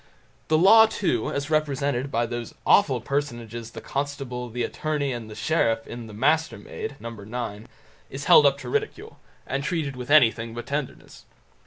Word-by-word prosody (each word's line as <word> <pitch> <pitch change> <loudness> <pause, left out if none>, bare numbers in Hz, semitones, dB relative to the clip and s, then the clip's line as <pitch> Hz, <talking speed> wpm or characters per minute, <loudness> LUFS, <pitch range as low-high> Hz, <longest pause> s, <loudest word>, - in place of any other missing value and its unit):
The 155 - +3
Law, 220 +6 +7
too, 175 - -1
as 140 +2 -3
represented 140 -3 0
by 120 -3 0
those 120 0 -6
awful 135 - +4
personages 120 -4 -4
the 115 - -9
Constable, 135 -3 -4
the 120 +1 -3
Attorney, 150 -3 -2
and 115 -2 -7
the 105 - -9
Sheriff 115 -1 +1
in 120 -1 -8
"The 110 - -11
Mastermaid", 160 - -1
No. 115 0 -7 0.4
xi, 110 - -14 0.4
is 135 +1 -6
held 145 - +8
up 140 0 +2
to - - -7
ridicule, 430 0 -3 0.3
and 140 +1 -2
treated 150 -4 -2
with 125 0 -7
anything 115 -5 +4
but 120 -1 -6
tenderness. 140 +1 -5
135 Hz, 165 wpm, -25 LUFS, 120-155 Hz, 0.4 s, held